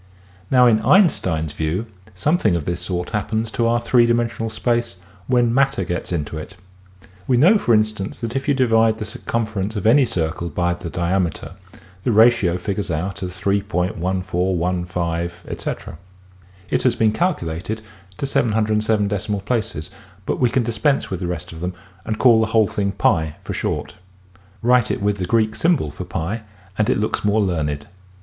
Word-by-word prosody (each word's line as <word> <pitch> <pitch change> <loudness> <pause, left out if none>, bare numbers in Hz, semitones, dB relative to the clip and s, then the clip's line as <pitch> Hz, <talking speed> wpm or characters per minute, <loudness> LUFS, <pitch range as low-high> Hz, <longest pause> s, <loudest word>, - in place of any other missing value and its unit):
Now 125 -1 +5
in 115 -3 +5
Einstein's 85 - +3
view 80 +8 -2 0.3
something 110 - +2
of 80 -4 -2
this 85 0 -2
sort 90 -1 -3
hap 105 -3 -1
pens 110 0 -1
to 115 0 +1
our 120 +1 +2
three 120 0 +3
dimensional 120 -1 0
space 120 0 -1 0.3
when 120 -2 +3
matter 135 -5 +2
gets 90 0 -4
into 80 -2 -3
it. 85 +6 -9 0.7
We 125 - +3
know 185 - +6
for 120 - +3
instance 105 -2 -1
that 115 +1 -4
if 135 - -2
you 145 - +3
divide 115 -3 +3
the 110 - -4
circumference 110 -2 -3
of 100 - -3
any 130 +4 +5
circle 85 -2 -2
by 85 +1 0
the 85 -1 -7
diameter 90 +1 -1 0.5
the 120 - 0
ratio 110 -5 +4
figures 100 +2 -3
out 95 +5 -3
as 90 -1 -6
3.1415+. 90 -3 -2 0.8
It - - +2
has 125 -2 +2
been 110 -1 +3
calculated 110 - -2 0.4
to - - -2
707 110 -4 +1
decimal 105 0 -2
places 110 -7 -2 0.3
but - - -2
we 125 - +3
can 125 +1 +1
dispense 115 +4 0
with 95 - -2
the 90 - -3
rest 90 - -4
of 80 - -9
them 90 0 -3 0.3
and 110 - -2
call 120 -3 +6
the 110 - +1
whole 110 -1 +3
thing 100 0 -1
Pi 80 -5 +1
for - - -5
short. - - -3 0.7
Write 125 -2 +4
it - - -1
in 105 +1 +1
Greek 110 +3 +2
as - - -7
^ 105 - -1 0.3
and 105 +1 +1
it - - +3
looks 105 - -1
more 105 +1 +2
learned. 75 -6 -1
105 Hz, 165 wpm, -21 LUFS, 90-115 Hz, 0.8 s, know